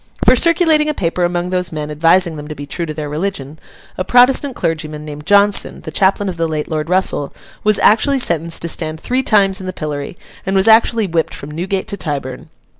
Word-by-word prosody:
For 250 - +6
circulating 325 0 +3
a 300 - -2
paper 175 -2 -2
among 175 +1 -2
those 180 -1 -2
men 150 -1 -5
advising 165 +2 +2
them 150 -1 -8
to 150 - -7
be 145 - -8
true 170 +4 -5
to 155 - -5
their 150 -1 -5
religion, 150 -2 -5 0.4
a - - 0
Protestant 250 +5 +3
clergyman, 155 -3 -4
named 150 0 -9
Johnson, 205 0 +3
the - - -8
chaplain 195 +1 +1
of 180 -2 -5
the 165 0 -1
late 155 -1 -3
Lord 155 0 -4
Russell, 180 -6 +1 0.3
was 215 -1 +3
actually 270 +6 +3
sentenced 170 - +1
to - - -2
stand 160 -1 -2
three 255 +8 -1
times 200 -6 +2
in 185 - -7
the 185 - -4
pillory, 150 -1 -6 0.3
and 190 0 -2
was 190 +2 +3
actually 225 0 +4
whipped 165 -3 -2
from 140 - -9
Newgate 185 +5 -3
to 200 - -4
Tyburn. 135 -6 -5
175 Hz, 210 wpm, -16 LUFS, 155-200 Hz, 0.4 s, For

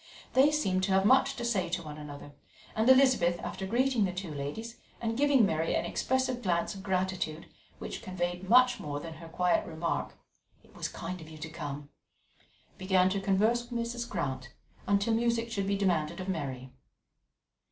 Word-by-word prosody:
They 270 +3 +6
seemed 195 -12 +1
to 190 - 0
have 190 0 +3
much 265 +3 +4
to 240 - -4
say 200 -7 0
to 170 0 -2
one 150 -1 -8
another; 145 -1 -9 0.4
and 220 +3 +2
Elizabeth, 255 -10 +5
after 190 - -5
greeting 245 +1 +2
the 190 - +1
two 180 -3 -5
ladies, 150 +12 -5 0.2
and 225 -1 -2
giving 275 -3 +4
Mary 160 -3 0
an - - 0
expressive 260 -1 0
glance 175 -4 0
of 195 - -9
gratitude 185 -4 -2 0.3
which - - -6
conveyed 180 0 -3
much 250 +1 +6
more 145 -1 -4
than 165 +2 -7
her 165 0 -10
quiet 180 +1 +2
remark: 165 +1 -3 0.5
"It - - -22
was - - -3
kind 185 -2 -6
of 155 - -11
you 155 - -11
to 155 +1 -6
come," 145 -2 -6 0.9
began 185 -1 +3
to 195 0 -1
converse 215 +5 +2
with 240 -1 -2
Mrs. 235 +1 -3
Grant 130 -8 -3 0.4
until 200 +3 +2
music 230 0 +1
should 200 -3 -1
be 200 0 +1
demanded 175 -6 0
of 185 - -5
Mary. 135 -8 -4
190 Hz, 180 wpm, -30 LUFS, 165-235 Hz, 0.9 s, They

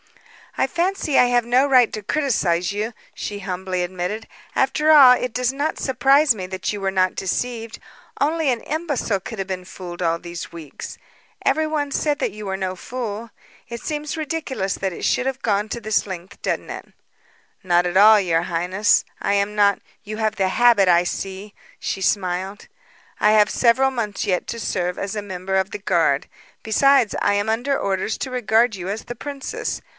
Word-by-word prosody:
"I - - +3
fancy 345 -4 0
I - - +7
have 245 -1 +2
no 250 +3 +3
right 255 -4 +4
to 215 - -4
criticise 200 - 0
you," 215 +3 -3 0.2
she 205 -1 -5
humbly 185 -1 -3
admitted. 185 +5 -4 0.3
"After 300 +3 +2
all, 275 -5 +9
it 250 -1 -1
does 250 +1 0
not 290 +3 -2
surprise 270 +1 +3
me 185 -3 -5
that 190 +2 -3
you 205 - -5
were 195 - 0
not 185 -1 +1
deceived. 230 +3 -3 0.4
Only 310 +1 +1
an 235 -2 -2
imbecile 290 - -2
could 225 - -7
have 195 - -3
been 185 -1 -4
fooled 180 -1 -9
all 165 -1 +1
these 170 0 -7
weeks. 160 -4 -9 0.5
Everyone 310 -2 +1
said 295 0 0
that - - -1
you 210 -1 -8
were 190 0 -2
no 185 -1 -3
fool. 230 +1 -5 0.4
It 235 0 -5
seems 300 +1 -4
ridiculous 300 -10 -2
that 190 -1 -2
it - - -5
should 250 - +1
have 265 0 -2
gone 210 -1 0
to 235 - -4
this 215 -1 0
length, 185 -1 -8
doesn't - - -2
it?" - - -7 0.8
"Not 175 -1 +3
at 175 +1 -2
all, 210 +2 +8
your 170 -4 +1
highness. 180 +4 +1 0.2
I 200 - +1
am 200 +1 0
not 200 -1 +3
" - - -39
"You 215 +1 -6
have 220 -1 0
the 190 -1 +1
habit, 230 -2 +4
I 175 0 +5
see," 195 +3 -5 0.3
she 195 - -3
smiled. 190 0 -1 0.5
"I 210 - +5
have 210 -1 +4
several 260 +3 +3
months 220 -5 -3
yet 180 -2 -1
to 230 - -5
serve 180 -4 -2
as 200 +1 -4
a 210 - -2
member 190 -1 -4
of 190 +1 +1
the - - -4
guard. 170 -8 +1 0.3
Besides, 250 +1 +3
I 205 - +2
am 205 +1 0
under 245 +5 0
orders 195 +2 -1
to 260 - -4
regard 235 -1 +2
you 185 0 -6
as 210 +3 -4
the 240 - -6
princess. 280 +2 -5
210 Hz, 190 wpm, -22 LUFS, 190-250 Hz, 0.8 s, all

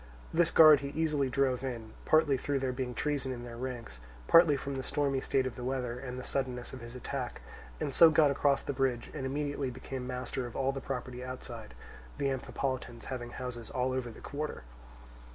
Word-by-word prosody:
This 170 +1 +4
guard 155 -3 +9
he 140 - -4
easily 150 -4 +1
drove 130 -1 +1
in, 115 -4 -4
partly 155 -3 +4
through 140 +2 -1
there 130 -1 0
being 125 -1 -3
treason 140 -1 -1
in 120 -1 -5
their 120 -1 -7
ranks, 120 - -6 0.3
partly 165 -4 +7
from 140 +1 -4
the 130 - -2
stormy 135 0 0
state 130 -1 +1
of 130 -4 -3
the 125 - -6
weather 125 -1 -2
and 125 -1 -6
the 130 - -5
suddenness 130 -3 -2
of 130 - -7
his 120 +1 -9
attack, 125 0 -4 0.4
and 140 - -2
so 165 - +9
got 155 -2 +5
across 140 0 +2
the - - -2
bridge, 130 -3 0
and 130 - -3
immediately 145 0 -1
became 130 0 -6
master 125 0 -3
of 120 - -11
all 135 0 +1
the 135 0 -5
property 125 -2 -4
outside; 130 - -7 0.4
the 140 - +1
Amphipolitans 130 -2 -3
having 120 -2 -5
houses 120 -2 -6
all 130 0 0
over 130 -2 -2
the 110 - -11
quarter. 150 - -4
130 Hz, 200 wpm, -31 LUFS, 125-140 Hz, 0.4 s, guard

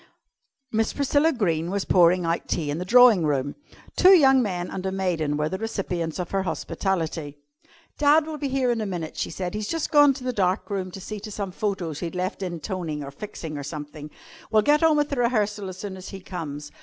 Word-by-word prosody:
Miss 220 0 0
Priscilla 285 +3 +2
Greene 170 - 0
was 200 +1 -2
pouring 180 0 +4
out 165 +1 -1
tea 150 -4 -1
in 150 - -3
the 180 - -4
drawing 240 -3 +6
room. 140 -2 0 0.4
Two 375 +1 +7
young 270 -5 +6
men 180 -5 -3
and 185 - -5
a - - -1
maiden 170 -6 -1
were 150 0 0
the 190 +4 -4
recipients 180 -7 -3
of 180 -2 -4
her 195 - +1
hospitality. 160 -3 -3 0.6
"Dad 300 +1 +5
will 310 -1 -6
be 285 - -1
here 260 -2 +1
in 230 -2 -1
a 215 - -2
minute," 175 -4 -5
she - - -2
said. 180 +2 -4
"He's 210 0 -3
just 330 +4 -2
gone 290 -3 +6
to 260 - -9
the 255 0 -2
dark 190 0 0
room 190 -2 -2
to 190 - -9
see 210 +3 -6
to 215 - -8
some 200 -2 -4
photos 185 -6 -3
he'd 170 0 -5
left 185 +2 -3
in 175 -3 -4
toning 165 -5 -4
or 140 - -7
fixing, 155 -2 -7
or - - -5
something. 150 0 -7 0.4
We'll 215 -1 +3
get 295 +5 +4
on 320 -2 +4
with 295 0 +1
the 280 - -3
rehearsal 210 -5 0
as 185 - -8
soon 195 0 -6
as 185 0 -9
he 195 - -8
comes. 150 -6 -7
190 Hz, 225 wpm, -25 LUFS, 165-225 Hz, 0.6 s, Two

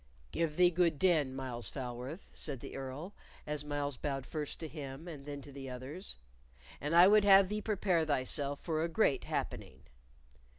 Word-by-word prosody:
"Give 155 - -1
thee 180 -1 +6
good 170 -3 +2
den, 150 -7 +3
Myles 125 -3 -3
Falworth," 130 +6 -6
said 140 -5 -2
the - - -8
Earl, 135 +8 -6 0.3
as 150 -1 -1
Myles 145 -2 -2
bowed 135 -2 -3
first 150 -2 -4
to 160 - -3
him 145 0 -7
and 145 -4 -8
then 145 -1 -6
to 145 - -11
the 135 -1 -7
others; 130 +9 -7 0.6
"and 150 +4 0
I 175 +2 +9
would 210 +1 +6
have 195 -1 +7
thee 210 0 -2
prepare 195 -6 +1
thyself 145 -1 0
for 160 -2 -1
a 170 - 0
great 165 -5 +2
happening." 65 +1 -4
150 Hz, 175 wpm, -33 LUFS, 135-170 Hz, 0.6 s, I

